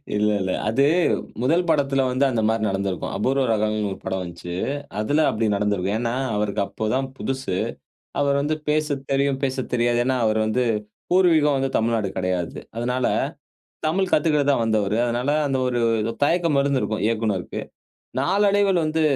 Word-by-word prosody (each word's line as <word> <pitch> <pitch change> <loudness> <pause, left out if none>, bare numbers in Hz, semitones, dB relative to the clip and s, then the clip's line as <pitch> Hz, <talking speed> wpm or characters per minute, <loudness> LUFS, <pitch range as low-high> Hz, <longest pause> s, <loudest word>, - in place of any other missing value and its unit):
இல்ல, 105 +1 +2
இல்ல. 95 0 -1 0.2
அது 135 +6 +3 0.6
முதல் 165 +7 +2
படத்துல 140 -3 +2
வந்து 130 +2 +2
அந்த 115 -3 0
மாரி 110 0 +1
நடந்துருக்கும். 95 -2 -2
"அபூர்வ 135 +5 +1
ராகம்னு" 110 -1 +1
ஒரு - - -5
படம் 95 0 -2
வந்துச்சு. 85 0 -7 0.4
அதுல 145 +8 +2
அப்டி 110 0 0
நடந்துருக்கும். 100 -1 0
ஏன்னா 120 0 -1 0.2
அவருக்கு 105 -1 -1
அப்போதான் 130 +5 -1
புதுசு. 130 -8 -3 0.6
அவரு 140 -1 +2
வந்து 155 +1 0
பேச 150 -1 +1 0.2
தெரியும், 135 -1 +1
பேசத் 130 -1 -2
தெரியாது. 120 0 +2
ஏன்னா 130 0 +1
அவர் 110 0 +1
வந்து 125 +3 +1 0.5
பூர்வீகம் 160 -6 +4
வந்து 135 0 0
தமிழ்நாடு 115 -2 +1
கெடையாது. 90 -2 -2 0.2
அதனால, 125 +2 0 0.8
தமிழ் 185 +3 0
கத்துக்க 150 -2 +3
தான் 135 - +1
வந்தவரு. 110 -2 +1
அதனால 120 +3 -1 0.2
அந்த 135 -1 0
ஒரு, 120 -1 0 0.2
ஒரு 115 +2 -2
தயக்கம் 165 -2 +2
இருந்துருக்கும் 130 -6 0
இயக்குனருக்கு. 110 -5 -2 0.6
நாளடைவுல 200 -2 +3
வந்து 160 +1 0
125 Hz, 150 wpm, -23 LUFS, 105-145 Hz, 0.8 s, பூர்வீகம்